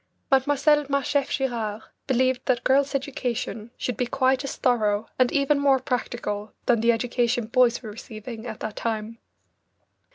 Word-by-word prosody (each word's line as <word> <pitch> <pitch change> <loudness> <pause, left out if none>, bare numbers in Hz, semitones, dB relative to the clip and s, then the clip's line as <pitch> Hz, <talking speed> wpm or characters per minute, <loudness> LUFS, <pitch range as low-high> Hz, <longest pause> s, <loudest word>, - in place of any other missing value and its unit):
Mlle. 290 +2 +3
Marchef 280 0 +1
Girard 225 -5 -2 0.2
believed 260 -1 +1
that 250 -3 +1
girls' 275 +1 +3
education 250 -5 -3
should 250 - -3
be 250 - 0
quite 265 0 +2
as 275 - -4
thorough 215 -4 +1
and 255 -1 +4
even 280 0 +2
more 280 -1 +4
practical 240 -5 -3
than 235 -3 +3
the 235 +1 +5
education 240 0 0
boys 245 +1 +2
were 215 - -6
receiving 220 +2 -8
at 220 -2 -7
that 215 -1 -5
time. 225 0 -3
245 Hz, 150 wpm, -25 LUFS, 225-270 Hz, 0.2 s, the